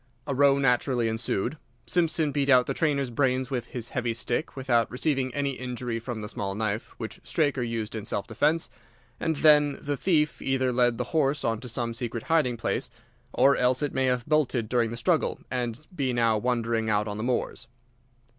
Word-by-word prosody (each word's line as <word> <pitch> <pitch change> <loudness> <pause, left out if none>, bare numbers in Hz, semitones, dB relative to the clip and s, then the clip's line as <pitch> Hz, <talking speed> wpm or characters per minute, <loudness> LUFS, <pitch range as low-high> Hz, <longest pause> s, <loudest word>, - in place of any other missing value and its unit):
A 140 - -2
row 140 +1 +4
naturally 125 -2 +2
ensued. 115 +4 -2 0.3
Simpson 165 -3 +1
beat 140 -1 0
out 125 -2 +6
the - - -2
trainer's 140 -5 0
brains 130 +1 0
with 120 -3 -2
his 120 -1 -5
heavy 120 -2 -2
stick 120 +5 -2
without 120 -4 +1
receiving 130 0 0
any 140 -1 0
injury 125 -2 -4
from 115 -1 -5
the - - -4
small 100 -1 -4
knife 110 0 -3
which 110 -2 -7
Straker 145 -5 0
used 115 -2 -3
in 110 -2 -4
self 100 -2 -2
defence, 155 +9 +1 0.5
and 160 -1 0
then 150 -1 +5
the 145 0 -3
thief 155 -4 +1
either 130 -1 +1
led 120 -1 +2
the 125 - -1
horse 145 -2 +2
on 115 -1 0
to 125 +1 -8
some 115 0 -2
secret 115 -1 -4
hiding 150 -7 +2
place, 115 - -2 0.4
or 140 +1 +4
else 125 +2 +2
it 145 - -1
may 130 - +1
have 125 -2 0
bolted 135 -7 +1
during 120 -2 +2
the 115 - -6
struggle, 115 - +1
and 125 +2 -3
be 135 -5 0
now 115 -2 +3
wandering 115 -1 0
out 105 0 +1
on 105 0 -4
the 110 - -3
moors. 120 -1 -2
125 Hz, 195 wpm, -27 LUFS, 115-140 Hz, 0.5 s, out